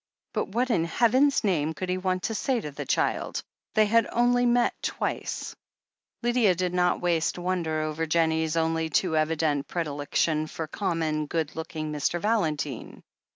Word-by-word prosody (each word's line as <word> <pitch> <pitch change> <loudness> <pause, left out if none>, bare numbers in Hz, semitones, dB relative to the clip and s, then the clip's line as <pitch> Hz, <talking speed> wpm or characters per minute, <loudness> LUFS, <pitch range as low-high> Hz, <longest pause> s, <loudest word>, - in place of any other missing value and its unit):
But - - -1
what 240 +5 0
in 165 -7 +2
Heaven's 255 - +3
name 160 -6 +1
could 185 - -4
he 180 0 -1
want 185 0 -1
to 225 - -1
say 250 +3 0
to 150 -9 -6
the 140 - -7
child - - 0 0.2
— - - -44
^they 215 -1 +5
had 230 +1 +3
only 245 +1 +3
met 240 0 +3
twice! - - -3 0.7
Lydia 240 -6 +3
did 180 0 -1
not 180 0 +2
waste 170 -2 +1
wonder 175 -3 -1
over 155 +1 -2
Jennie's 160 0 +1
only 160 0 +1
too 160 +1 +1
evident 155 -2 +1
predilection 155 -1 -1
for 160 - -5
common, 155 -3 -1
good 160 -1 -2
looking 155 -1 -4
Mr. 150 +3 -1
Valentine. 155 - -1
165 Hz, 160 wpm, -27 LUFS, 155-205 Hz, 0.7 s, ^they